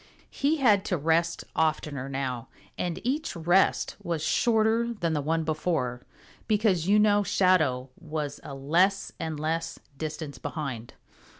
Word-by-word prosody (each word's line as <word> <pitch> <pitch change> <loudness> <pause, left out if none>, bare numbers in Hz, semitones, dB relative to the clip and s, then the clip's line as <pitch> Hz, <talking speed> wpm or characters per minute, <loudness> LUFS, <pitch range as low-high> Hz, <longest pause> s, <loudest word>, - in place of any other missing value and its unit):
He 295 +3 +1
had 215 -8 +4
to 180 - 0
rest 165 +2 +1
oftener 150 -4 0
now, 130 -3 -3 0.3
and 175 0 -3
each 290 +5 -1
rest 175 +3 +2
was 165 -3 -2
shorter 230 +4 +2
than 170 -6 -1
the 150 - 0
one 160 +3 0
before, 155 -6 -1 0.5
because, 205 -6 +2
you 205 +2 +5
know, 210 -1 +4
Shadow 155 -10 +2
was 155 -3 -4
a 140 -2 -8
less 175 +8 +2
and 160 -2 -3
less 160 +2 -2 0.2
distance 155 -2 -5
behind. 130 -8 -5
165 Hz, 135 wpm, -27 LUFS, 150-195 Hz, 0.5 s, you